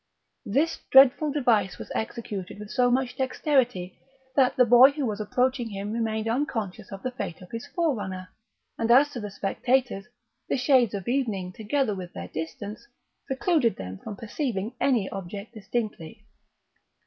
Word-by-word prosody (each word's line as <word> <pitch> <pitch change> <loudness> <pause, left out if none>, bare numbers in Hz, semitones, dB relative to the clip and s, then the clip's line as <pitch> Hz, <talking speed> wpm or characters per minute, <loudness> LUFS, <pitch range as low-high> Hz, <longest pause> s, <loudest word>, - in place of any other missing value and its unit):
This 285 +11 +1
dreadful 270 +3 +7
device 220 - +2
was - - -9
executed 210 -5 -4
with 210 0 -9
so 250 -2 +3
much 250 0 0
dexterity 255 - 0 0.4
that 265 -3 +4
the 250 - +5
boy 245 +3 +8
who 285 -2 -2
was 215 -2 -2
approaching 250 +3 0
him 200 0 -5
remained 220 -1 -1
unconscious 225 -6 -2
of 195 0 -8
the 255 - -2
fate 175 -9 -5
of 180 - -14
his 230 +1 -6
forerunner; 205 - -2 0.5
and 230 - 0
as 275 +5 +6
to 245 - -5
the 210 -2 -5
spectators, 220 +2 0 0.4
the - - +1
shades 250 -5 +3
of 195 -3 -6
evening, 220 -8 -1
together 220 +3 0
with 185 -2 -7
their 85 +1 -7
distance, 200 - -6 0.4
precluded 265 -3 +1
them 95 0 -7
from 210 - -7
perceiving 225 -1 -3
any 240 -8 +2
object 200 +4 -7
distinctly. 215 -2 -5
225 Hz, 155 wpm, -26 LUFS, 195-260 Hz, 0.5 s, boy